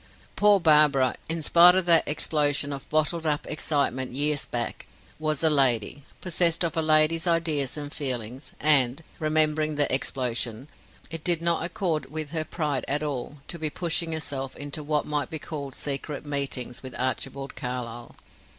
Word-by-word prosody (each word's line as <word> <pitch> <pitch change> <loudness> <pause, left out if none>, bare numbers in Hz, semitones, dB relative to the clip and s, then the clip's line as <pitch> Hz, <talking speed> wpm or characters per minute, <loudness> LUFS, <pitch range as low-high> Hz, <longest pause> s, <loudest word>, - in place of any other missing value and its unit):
Poor 205 -1 +4
Barbara, 150 -6 +4 0.2
in 165 -1 -2
spite 175 +3 +7
of 185 -2 +2
that 170 -2 +4
explosion 145 -1 0
of 140 - -9
bottled 155 +2 0
up 150 -1 0
excitement 140 -5 -1
years 145 +2 +1
back, 120 -1 -5 0.3
was 155 -1 -1
a 160 - +6
lady, 135 -2 +2 0.2
possessed 170 -1 +2
of 170 - -2
a 165 - +1
lady's 155 +2 +3
ideas 160 -5 0
and 145 0 -6
feelings, 130 -2 -4
and 140 -1 +4 0.2
remembering 155 0 +2
the 145 -2 +2
explosion 125 -2 -1 0.4
it 165 -1 -6
did 175 -2 +4
not 170 0 +2
accord 170 -3 -3
with 155 0 -4
her 160 -2 -1
pride 150 -4 -3
at 145 +2 0
all 145 0 -5
to 170 - -7
be 155 -1 -1
pushing 170 +1 -1
herself 135 -4 -3
into 145 +1 -5
what 150 0 -1
might 150 -1 -2
be 160 - -3
called 140 -3 -6
secret 145 +1 -4
meetings 140 -4 -2
with 130 -2 -9
Archibald 135 +2 -3
Carlyle. 120 -2 -6
150 Hz, 160 wpm, -25 LUFS, 135-160 Hz, 0.4 s, spite